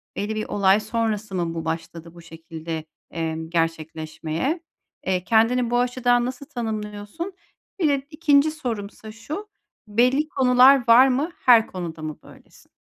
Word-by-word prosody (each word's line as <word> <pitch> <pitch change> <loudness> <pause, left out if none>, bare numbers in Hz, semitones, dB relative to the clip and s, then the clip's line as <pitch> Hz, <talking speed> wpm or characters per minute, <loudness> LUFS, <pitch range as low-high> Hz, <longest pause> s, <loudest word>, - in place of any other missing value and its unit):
belli 215 +2 -3
bir 215 - -2
olay 200 0 +3
sonrası 215 -2 -2
mı 170 -2 -1
bu 165 -1 -5
başladı 165 +1 -5
bu 170 - -13
şekilde, 165 -1 -7 0.3
emm, 160 -1 -4
gerçekleşmeye? 165 - -2 0.5
Eee, 185 -1 0
kendini 230 +3 +2
bu 240 0 +2
açıdan 245 -1 +2
nasıl 255 +2 -6
tanımlıyorsun? 220 - -5 0.5
Bir 320 - +3
de 280 -1 +1
2. 305 -2 +3
sorumsa 220 -7 -6
şu, 305 - -7 0.4
belli 250 +8 +2
konular 255 -1 +5
var 245 +3 +8
mı, 280 +7 0
her 235 -3 +7
konuda 170 -3 -6
mı 155 -1 -5
böylesin? - - -18
220 Hz, 140 wpm, -23 LUFS, 170-255 Hz, 0.5 s, var